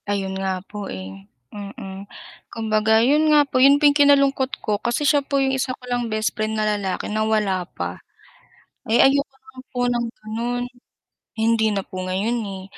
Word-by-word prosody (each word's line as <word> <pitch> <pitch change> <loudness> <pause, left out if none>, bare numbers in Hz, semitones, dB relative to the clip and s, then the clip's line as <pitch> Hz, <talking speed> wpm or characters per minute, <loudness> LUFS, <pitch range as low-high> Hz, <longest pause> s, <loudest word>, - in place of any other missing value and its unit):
Ayon 195 -1 -1
nga 190 -1 -3
po 205 -1 -7
eh, 95 +1 -9 0.2
mm 200 -1 -8 0.4
kumbaga 220 0 +2
'yon 300 +4 +3
nga 300 -1 +5
po 255 -2 0
'yon 280 +2 +7
po 295 - +1
kinalungkot 275 -2 +3
ko 210 -1 -1
kasi 240 +5 -1
siya 290 0 +4
po 280 0 -2
'yong 270 -1 +1
isa 260 -1 -2
ko - - -27
lang 245 -1 -2
bestfriend 215 0 -1
na 215 - +1
lalaki 195 -3 -3
na 215 +1 -2
wala 210 -5 0
pa. - - -6 0.8
Ay 225 +2 +1
ayoko 280 +1 +4 0.2
lang 260 -1 -12
po 250 - -7
ng 240 -1 0
gano'n, 235 +3 -4 0.8
hindi 225 0 +2
na 200 - -1
po 185 0 -6
ngayon 195 +6 -1 0.2
eh - - -10
220 Hz, 175 wpm, -22 LUFS, 200-260 Hz, 0.8 s, yon